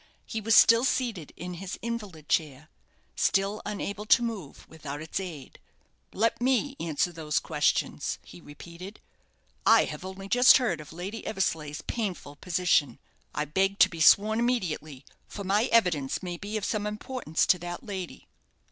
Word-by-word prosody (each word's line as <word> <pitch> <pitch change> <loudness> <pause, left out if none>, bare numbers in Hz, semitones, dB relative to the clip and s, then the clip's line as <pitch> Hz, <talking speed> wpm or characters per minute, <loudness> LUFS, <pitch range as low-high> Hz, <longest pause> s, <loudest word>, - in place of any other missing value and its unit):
He 220 - -4
was 225 +1 +3
still 230 +1 +7
seated 235 - -1
in 180 +1 -6
his 185 +2 -6
invalid 210 -10 -5
chair 150 -2 -1 0.5
still 195 +2 +1
unable 205 0 -4
to 240 - +5
move 210 -11 -6
without 145 -2 -7
its 155 +4 -4
aid. 165 -8 -8 0.5
"Let 230 +3 0
me 265 +2 +1
answer 165 +1 -1
those 155 -3 -3
questions," - - 0
he 90 - -13
repeated. 170 +7 -11 0.6
"I - - +6
have - - -7
only 190 +1 -7
just 245 +4 +7
heard 220 - -1
of 150 - -12
Lady 185 +7 -6
Eversleigh's 160 -8 -2
painful 185 -10 -4
position. 170 -7 +1 0.4
I 150 - -1
beg 195 +6 0
to 185 - +6
be 165 -3 -7
sworn 215 +6 +5
immediately, 160 - -2 0.2
for 200 - -7
my 200 +4 +2
evidence 180 - +1
may 175 -1 -4
be 205 +5 -4
of 205 - -3
some 210 -1 -1
importance 210 -4 -2
to 180 - +3
that 175 0 -6
lady." 190 -4 -7
190 Hz, 155 wpm, -28 LUFS, 160-215 Hz, 0.6 s, still